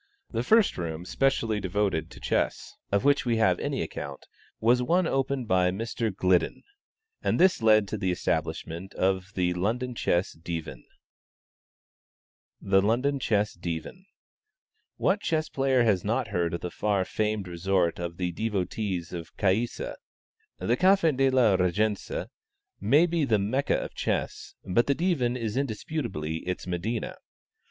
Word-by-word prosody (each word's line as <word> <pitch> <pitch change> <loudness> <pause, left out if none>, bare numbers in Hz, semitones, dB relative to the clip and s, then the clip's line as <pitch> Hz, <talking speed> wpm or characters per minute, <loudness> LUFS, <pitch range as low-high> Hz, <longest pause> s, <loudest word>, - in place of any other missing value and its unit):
The 115 - -1
first 220 - +3
room 85 0 -4
specially 115 -3 +1
devoted 95 -4 -1
to - - -12
chess, - - -1 0.2
of 100 0 +2
which 140 -2 +4
we 120 -2 +1
have 95 -5 +3
any - - -1
account, - - -7 0.3
was 120 +3 +3
one 175 +8 +2
opened 135 -4 -1
by 90 -2 +3
Mr. 115 +4 -2
Gliddon, 90 -2 +1 0.6
and - - 0
this 185 -6 +4
led 110 -2 +5
to 110 - -3
the 95 -2 0
establishment 90 0 -2
of 95 0 0
the 90 -1 +1
London 115 +8 -1
Chess 90 -5 0
Divan. 80 -6 -6 1.8
THE 95 0 +3
LONDON 125 +7 +1
CHESS 105 -4 +1
DIVAN. 85 - -6 0.9
What 200 +2 +1
chess 155 -1 0
player 135 -2 +2
has 100 -6 +2
not 115 +3 -1
heard 85 -4 0
of - - -6
the 90 - -4
far 100 -3 0
famed 105 -2 -1
resort 90 -1 0
of 85 -1 -5
the 90 -1 -1
devotees 95 -2 -2
of 85 -2 -8
Caïssa? 105 +5 0 0.6
The 120 - 0
Café 185 -5 +4
de 135 +1 +3
la 120 -7 +4
Régence 100 +3 0 0.5
may 140 - +4
be 170 -2 0
the 115 -6 +3
Mecca 120 +8 0
of - - -4
chess, - - -3
but 115 +6 +2
the 140 - +2
Divan 135 -9 +1
is 110 -3 -3
indisputably 120 - -3
its 90 +2 -4
Medina. 95 +6 -3
105 Hz, 145 wpm, -27 LUFS, 90-125 Hz, 1.8 s, led